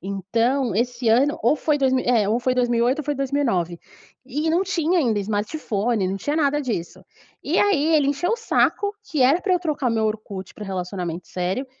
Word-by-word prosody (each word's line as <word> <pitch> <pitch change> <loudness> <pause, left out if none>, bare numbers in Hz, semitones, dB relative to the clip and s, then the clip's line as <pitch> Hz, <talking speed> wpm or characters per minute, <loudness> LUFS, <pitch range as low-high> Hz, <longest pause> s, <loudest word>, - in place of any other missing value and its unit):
Então 225 +6 -1
esse 240 +1 -1
ano 260 +6 +3
ou 240 +7 +3
foi 300 +1 +1
dois 265 -2 +2
mi 260 - +2
é, 225 -5 +2
ou 225 +3 +2
foi 255 +1 +1
2008 245 +2 +1
ou - - -8
foi 295 - -1
2009. 255 - -1 0.5
E 295 +5 -2
não 345 +4 +2
tinha 355 -2 0
ainda 230 -7 +1
smartphone, 210 0 -1
não 190 - -2
tinha 290 +10 -2
nada 295 -1 +2
disso. 220 -11 -4 0.4
E - - 0
aí 325 -6 +3
ele 285 -2 +2
encheu 290 +6 0
o 460 - +1
saco, 420 -2 +1 0.2
que 305 - -1
era 280 +7 +4
pra 380 - 0
eu - - +2
trocar 295 -7 -1
o - - -1
meu 220 -1 +1
Orkut 210 -3 -4
pra 210 - -8
relacionamento 180 -3 -5
sério, 185 +9 -2
250 Hz, 205 wpm, -22 LUFS, 205-295 Hz, 0.5 s, era